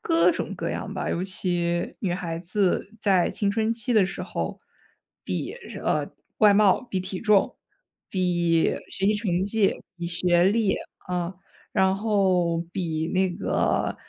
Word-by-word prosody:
各 330 0 +4
种 - - -3
各 - - -3
样 - - -4
吧， - - -3
尤 175 - -1
其 175 -2 -1
女 185 -4 -1
孩 170 -2 -3
子 190 +3 0
在 190 -4 +3
青 200 -2 0
春 220 +2 +1
期 230 +1 -1
的 215 -4 +5
时 - - -6
候， - - -4 0.7
比， - - -3 0.3
呃， - - 0 0.3
外 210 -2 +6
貌、 205 +1 +5
比 205 -7 -3
体 185 0 -5
重、 210 -3 +3 0.5
比 175 -3 +2
学 195 - -4
习 210 - +4
成 190 -4 0
绩、 205 -1 +1
比 175 -1 -4
学 175 0 +2
历， 205 0 +3 0.3
啊， 180 0 -2 0.4
然 190 0 +3
后 190 -5 +2
比 160 -3 -2
那 190 0 +2
个， - - 0
190 Hz, 160 characters per minute, -25 LUFS, 175-205 Hz, 0.7 s, 外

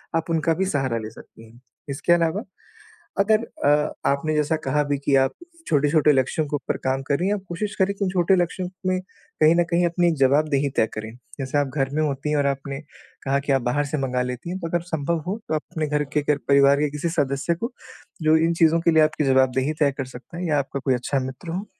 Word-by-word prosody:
आप 165 +1 -1
उनका 165 0 +1
भी 190 +3 0
सहारा 135 -9 -1
ले 110 -1 -5
सकती 115 +1 -15
हैं। 120 - -19 0.3
इसके 140 +5 +2
अलावा 170 +4 +1 0.8
अगर 215 +2 +4 0.3
अ, 150 +1 +3 0.2
आपने 140 +3 0
जैसा 150 +1 +1
कहा 150 +2 +2
भी 145 0 -1
कि 140 0 +1
आप 135 - +1 0.4
छोटे-छोटे 150 -1 +3
लक्ष्यों 135 +4 +1
के 145 - -2
ऊपर 145 - -3
काम 130 0 +1
कर 140 - +2
रही 180 - 0
हैं, 205 - +2
आप 205 - -6
कोशिश 200 +4 -3
करें 190 +1 +2
कि 200 - -3
उन - - 0
छोटे 180 0 +3
लक्ष्यों 180 +1 -1 0.2
में 185 0 +1 0.4
कहीं 155 +2 +6
न 175 - +4
कहीं 175 +1 +3
अपनी 175 0 +2
जवाबदेही 140 +1 +3
तय 110 - +4
करें। 110 0 -6 0.3
जैसे 135 +1 -2
आप 145 -1 +2
घर 135 -2 +1
में 155 - +1
होती 140 0 -2
हैं 150 - +1
और 145 - +1
आपने 140 0 -3 0.5
कहा 135 +1 +2
कि 140 0 -2
आप 135 - +2
बाहर 130 +5 0
से 145 +2 -3
मँगा 125 -2 -1
लेती 125 +6 -4
हैं, 185 - -4
तो 165 - -4
अगर 175 +1 -1
संभव 165 -1 -2
हो 200 +4 -1
तो - - 0
आप 155 - -1
अपने 155 -2 -2
घर 150 0 0
के 150 - +2
घर-परिवार 140 -1 +3
के 150 - +1
किसी 150 +3 -2
सदस्य 140 +1 0
को 230 +9 -4 0.5
जो 155 0 +5
इन 165 +1 +2
चीज़ों 165 0 +5
के 170 - +3
लिए 160 -1 +5
आपकी 155 0 +1
जवाबदेही 130 +2 +2
तय 145 -2 +4
कर 135 - -2
सकता 130 +6 -11
है 180 - -3
या 150 -2 +2
आपका 140 0 -3
कोई 135 - +3
अच्छा 125 +3 -1
मित्र 130 +6 -7
हो। 190 +5 -3
150 Hz, 240 wpm, -23 LUFS, 135-170 Hz, 0.8 s, कहीं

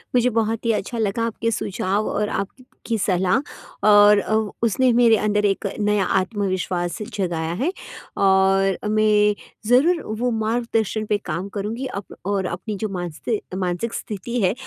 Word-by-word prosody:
मुझे 250 0 +4
बहुत 225 0 -1
ही 230 - +3
अच्छा 220 +2 -2
लगा 220 +1 0
आपके 230 0 -2
सुझाव 200 0 -1
और 210 0 -1
आपकी 230 +2 -4
सलाह 190 +3 +2 0.5
और 205 0 +7
अ, 215 - -2 0.3
उसने 245 +3 +3
मेरे 230 -2 +5
अंदर 210 0 +1
एक 200 0 0
नया 210 -1 +2 0.2
आत्मविश्वास 185 -3 -2
जगाया 170 -4 -2
है 340 +6 +1 0.5
और 195 0 +3
मैं 210 -1 +3 0.3
ज़रूर 320 +7 +4 0.2
वो 245 0 +1
मार्गदर्शन 225 -2 -1
पे 210 0 +1
काम 190 +2 -3
करूँगी 225 +6 -3 0.2
अप - - -14
और 195 -1 0
अपनी 190 +5 -4
जो - - -2
मानसि 180 +4 -3 0.2
मानसिक 185 +5 -2
स्थिति 235 +4 -4
है 190 +1 +3
210 Hz, 145 wpm, -22 LUFS, 190-230 Hz, 0.5 s, और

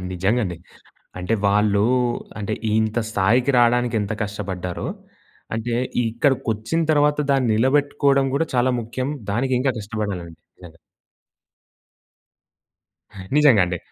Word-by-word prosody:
నిజంగా 95 +7 +1
అండి. 90 -3 -4 0.6
అంటే 90 +5 -1
వాళ్ళు 105 0 +3 0.5
అంటే 105 0 -3 0.2
ఇంత 110 +1 +1
స్థాయికి 115 +6 +2
రావడానికి 120 0 +3
ఎంత 105 +1 -3
కష్టపడ్డారో. 95 -3 -4 0.7
అంటే 115 +1 -2 0.3
ఇక్కడికొచ్చిన 120 +3 0
తర్వాత 150 -1 +3
దాన్ని 135 -3 +2
నిలబెట్టుకోడం 140 +2 +2
కూడా 160 +3 +1
చాలా 125 +1 +2
ముఖ్యం. 130 +4 -4 0.2
దానికి 130 +3 0
ఇంకా 135 -1 +1
కష్టపడాలండి 100 -6 -5 0.2
నిజంగా. 85 -2 -14 2.6
నిజంగా 135 -10 +6
అండి. 90 -1 -3
115 Hz, 105 wpm, -22 LUFS, 100-130 Hz, 2.6 s, నిజంగా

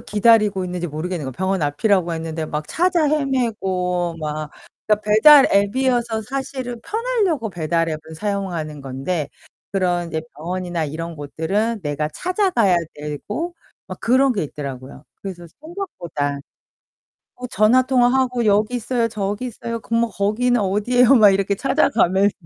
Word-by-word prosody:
기다리고 210 -3 +3
있는지 180 -1 -3
모르겠는거야. 155 -2 -4
병원 190 +4 -1
앞이라고 175 +4 +1
했는데 160 -1 -4
막 150 0 -4
찾아 345 -2 +2
헤매고 190 - -1
막 150 0 -4 0.4
그니까 210 -1 +2
배달 245 +8 +7
앱이어서 230 +2 +1
사실은 260 0 -5
편하려고 415 - -1
배달 165 -1 -1
앱을 155 0 -6
사용하는 175 -6 -3
건데 135 +4 -3 0.4
그런 175 -3 0
이제 160 -1 -3 0.2
병원이나 175 +1 -3
이런 165 +2 -5
곳들은 195 +10 -2
내가 150 0 -2
찾아가야 350 - +1 0.2
되고 205 - -5 0.3
막 - - -7
그런 260 +2 +3
게 195 -8 -1
있더라고요. 140 -1 -8 0.2
그래서 180 -3 -7
생각보다. 175 - -4 1.0
뭐 250 - -4
전화 225 +5 +4
통화하고 250 -1 +2
'여기 210 +3 +2
있어요. 240 0 0
저기 210 +1 -3
있어요. 230 -1 -5
그럼 230 +2 -1
뭐 235 - -1
거기는 235 +4 +1
어디에요.' 235 +6 +3
막 210 -3 +7
이렇게 195 +1 +1
찾아가면서 200 - +2
200 Hz, 340 characters per minute, -21 LUFS, 165-245 Hz, 1.0 s, 배달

